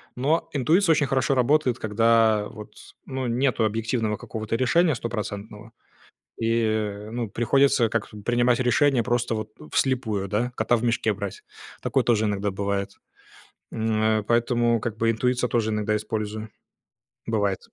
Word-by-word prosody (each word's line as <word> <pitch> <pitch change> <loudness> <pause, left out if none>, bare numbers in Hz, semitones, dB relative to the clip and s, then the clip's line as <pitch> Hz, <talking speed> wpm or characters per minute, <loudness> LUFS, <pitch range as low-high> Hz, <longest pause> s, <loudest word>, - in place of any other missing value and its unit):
Но 145 +6 0
интуиция 160 +6 +3
очень 145 -2 +1
хорошо 135 +1 +1
работает, 130 0 +2
когда 110 -1 +3
вот, 105 -1 -11 0.3
ну, 130 -1 -3
нету 120 -1 +1
объективного 110 0 -1
какого-то 110 +2 -4
решения 155 +6 +3
стопроцентного. 110 -1 -6 0.7
И 115 0 0
э, 105 -1 -2
ну, 120 -1 -3
приходится 120 +2 +2
как 110 -1 -2 0.2
принимать 120 0 +2
решения 130 0 +3
просто 120 0 0
вот 110 -1 -4 0.2
вслепую, 110 -7 0
да, 115 +5 -1
кота 120 - +2
в 115 - -3
мешке 115 -2 +1
брать. 100 -1 -6 0.4
Такое - - +1
тоже 110 -2 +2
иногда 100 0 -1
бывает. 100 0 -2 0.8
М, 110 -1 0
а, 110 0 +2
поэтому 120 +1 +2
как 110 0 -4
бы 115 0 +2
интуицию 125 +2 0
я - - -16
тоже 115 -2 +1
иногда 105 0 0
использую. 110 0 -4 0.8
Бывает. 100 -4 0
115 Hz, 145 wpm, -24 LUFS, 105-125 Hz, 0.8 s, интуиция